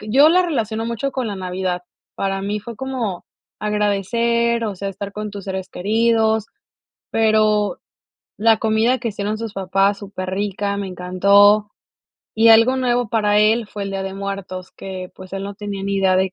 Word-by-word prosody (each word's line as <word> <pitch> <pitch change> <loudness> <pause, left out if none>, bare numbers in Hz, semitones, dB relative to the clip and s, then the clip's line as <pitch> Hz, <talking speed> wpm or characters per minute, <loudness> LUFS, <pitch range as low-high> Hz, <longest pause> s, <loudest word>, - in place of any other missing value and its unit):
Yo 260 +9 +5
la 365 +2 +4
relaciono 225 - -2
mucho 260 +4 -2
con 255 -3 -2
la 205 -3 -4
Navidad, 185 -1 -3 0.3
para 195 0 -2
mí 205 +1 -2
fue 235 +2 -8
como 240 -8 -3 0.4
agradecer, 230 +3 +1
o 205 -3 -3
sea, 195 +2 -4
estar 200 +1 -6
con 210 0 -5
tus 200 -2 -8
seres 190 -1 -4
queridos, 220 +2 +1 0.7
pero 215 -3 +2 0.6
la 225 +1 +4
comida 220 +4 +2
que 235 -2 -3
hicieron 210 +1 -3
sus 225 -2 -5
papás, 195 +1 +1
superrica, 200 +1 -3
me 200 -1 -3
encantó. 200 +3 +4 0.7
Y 225 +1 +5
algo 230 +3 +6
nuevo 245 -2 +1
para 210 -2 +2
él 220 +1 +3
fue 205 -1 -7
el 195 - -4
Día 195 0 -3
de 195 - -5
Muertos, 195 -2 -5
que 185 -1 -7
pues 185 0 -12
él 195 - -4
no 200 0 -6
tenía 200 -1 -5
ni 200 0 -1
idea 190 -1 +3
de 190 0 +1
205 Hz, 175 wpm, -20 LUFS, 195-225 Hz, 0.7 s, algo